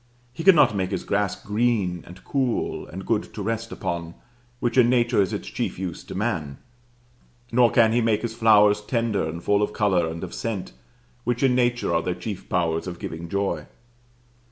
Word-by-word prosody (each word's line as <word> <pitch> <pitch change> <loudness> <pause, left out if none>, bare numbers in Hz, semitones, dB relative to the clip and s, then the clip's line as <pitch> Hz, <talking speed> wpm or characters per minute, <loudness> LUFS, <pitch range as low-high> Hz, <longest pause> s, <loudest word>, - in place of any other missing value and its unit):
He 165 - -6
cannot 165 - +6
make 95 -2 -1
his 95 - -3
grass 100 -1 0
green 105 -5 0
and 90 +2 -13
cool 130 -4 -1
and 95 +2 -8
good 110 -2 -1
to 105 - -4
rest 115 +2 -3
upon, 85 -1 -4 0.4
which 120 - -1
in 125 -2 +5
nature 120 -3 +3
is 95 - 0
its - - -4
chief - - -3
use 90 -2 -5
to - - -8
man; 85 -10 -2 0.9
nor 120 0 +5
can 115 -2 +4
he 120 +1 +2
make 110 -1 +1
his 115 -1 -2
flowers 105 -2 +5
tender 115 -1 0
and 85 +2 -7
full 105 0 +2
of 105 - -1
color 95 -6 +2
and 80 +1 -5
of - - -6
scent, 110 -5 -4 0.5
which 120 +1 -1
in 130 -2 +4
nature 120 -6 +1
are 85 - +2
their 90 +1 -2
chief 95 +2 -7
powers 85 -1 0
of 90 -1 -5
giving 85 0 -6
joy. 100 +1 -2
105 Hz, 190 wpm, -24 LUFS, 90-120 Hz, 0.9 s, cannot